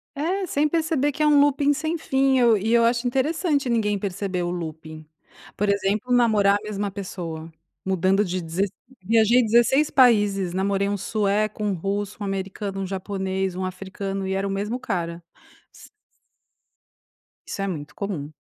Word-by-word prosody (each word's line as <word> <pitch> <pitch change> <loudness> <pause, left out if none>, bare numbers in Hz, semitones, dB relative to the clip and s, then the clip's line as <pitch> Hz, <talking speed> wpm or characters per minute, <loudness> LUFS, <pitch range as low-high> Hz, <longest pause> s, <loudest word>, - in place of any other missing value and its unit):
É, 365 +7 -1
sem 300 -1 +1
perceber 310 -3 0
que 295 - -6
é 305 - +4
um 295 -1 +5
looping 285 0 +3
sem 315 +3 -2
fim 270 -3 +1
e - - +3
eu 235 -3 +5
e 220 +4 0
eu 235 - +5
acho 235 +1 +1
interessante 285 +2 0
ninguém 210 -3 +1
perceber 190 -2 -3
o 175 - -2
looping. 160 -2 -7 0.5
Por 205 0 0
exemplo, 200 +4 0
namorar 215 -5 +4
a - - -16
mesma 205 -1 -3
pessoa, 170 -5 -6 0.3
mudando 190 +2 +2
de 185 0 -3
16, 180 +4 -2 0.3
viajei 230 +4 +4
16 240 +6 +3
países, 205 -8 +3
namorei 200 +1 0
um 205 - -1
sueco, 210 +1 -1
um 205 -2 +1
russo, 200 +3 -3
um - - -2
americano, 195 0 -4
um 190 - -3
japonês, 190 -1 -3
um 185 0 -3
africano 195 +1 -5
e 190 - -1
era 195 +1 -1
o - - -3
mesmo 210 +6 -2
cara 170 -3 -3 0.5
s - - -15 1.6
Isso - - -5
é 195 - -1
muito 150 -6 -6
comum. 175 -8 -4
200 Hz, 170 wpm, -24 LUFS, 190-240 Hz, 1.6 s, um